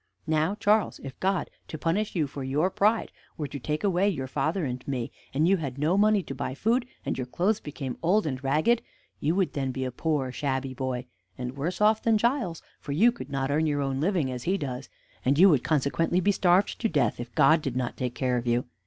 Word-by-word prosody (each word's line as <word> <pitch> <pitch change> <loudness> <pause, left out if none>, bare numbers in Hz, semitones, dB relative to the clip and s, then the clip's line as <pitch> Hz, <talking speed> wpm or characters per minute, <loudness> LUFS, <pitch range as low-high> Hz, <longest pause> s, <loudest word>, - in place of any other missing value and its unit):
Now, 160 +4 +1
Charles, 210 0 +2
if 135 -1 -8
God, 190 -1 0 0.2
to 155 - -6
punish 190 +8 -1
you 160 -4 +2
for 140 0 -6
your 150 +8 +1
pride, 215 +4 +2 0.3
were 150 - -2
to 140 +1 -7
take 150 +6 -3
away 195 0 +3
your 135 -9 -3
father 155 +6 -1
and 125 -1 -4
me, 125 -4 -2 0.2
and 150 +5 +2
you 195 +1 +4
had 140 -6 -5
no 155 +5 +2
money 210 -1 +4
to 140 - -6
buy 135 -1 -4
food, 235 - +1 0.2
and - - -2
your 125 - -3
clothes 190 - +1
became 140 -3 -6
old 185 +5 +3
and 135 -3 -3
ragged, 155 - +2 0.4
you 160 +4 +1
would 190 -2 +1
then 135 -2 -1
be 130 0 -3
a 130 - -3
poor, 140 -1 -1
shabby 135 -1 -2
boy, 130 -1 -3 0.3
and 125 +1 -5
worse 160 +6 -3
off 215 +1 +4
than 225 -1 +3
Giles; 235 - 0 0.2
for 140 - -5
you 220 +11 +5
could 190 - -9
not 135 0 -1
earn 155 +2 +2
your 145 -1 0
own 135 -1 -1
living, 165 -6 +1
as 125 -1 -5
he 190 +3 +2
does; 135 -5 -5 0.3
and 135 +2 +2
you 190 +4 +8
would 145 -8 +3
consequently 160 +4 +1
be 205 +2 +3
starved 185 0 +2
to 225 - +2
death 150 -8 +1
if 120 0 -7
God 160 0 +5
did 135 -4 -3
not 125 -2 -2
take 125 -1 -3
care 125 -2 0
of 120 0 -4
you. 120 +1 +1
150 Hz, 230 wpm, -27 LUFS, 130-190 Hz, 0.4 s, you